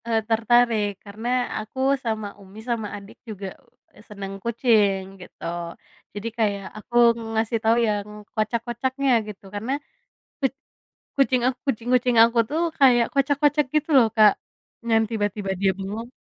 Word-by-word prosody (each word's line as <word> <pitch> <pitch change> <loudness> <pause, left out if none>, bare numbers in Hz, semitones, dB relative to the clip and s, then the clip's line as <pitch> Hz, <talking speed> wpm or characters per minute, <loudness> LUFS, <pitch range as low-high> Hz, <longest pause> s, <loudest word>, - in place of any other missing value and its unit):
E - - -2 0.2
tertarik, 230 -1 +3 0.2
karena 210 +3 -7 0.3
aku 215 +4 -8 0.3
sama 220 -2 -2
Umi 195 +2 -13
sama 225 -3 -1
adik 200 +1 -13
juga, 200 -2 -6 0.5
e - - -15
seneng 195 -2 -7
kucing, 220 -4 +2 0.2
gitu. 180 - -15 0.7
Jadi 205 +3 -5
kayak, 200 -3 0
aku 225 +3 -10 0.4
ngasih 225 +1 0
tau 225 +1 +4
yang 205 -1 -1 0.3
kocak-kocaknya 240 +5 -1 0.2
gitu, 210 -2 -9
karena 220 +5 -3 0.7
kuc 270 -2 +1 0.7
kucing 260 -2 +3
a - - +5 0.2
kucing-kucing 250 -1 +1
aku 230 +1 +3
tuh 315 +3 -1 0.2
kayak 245 -4 +6
kocak-kocak 285 +2 +2
gitu 305 +1 +1
loh, 235 -3 +6
Kak, 215 -2 +7 0.6
yang 225 0 +4
tiba-tiba 205 -2 -2
dia 195 -1 +4
bengong. 210 +4 -5
225 Hz, 135 wpm, -24 LUFS, 205-245 Hz, 0.7 s, Kak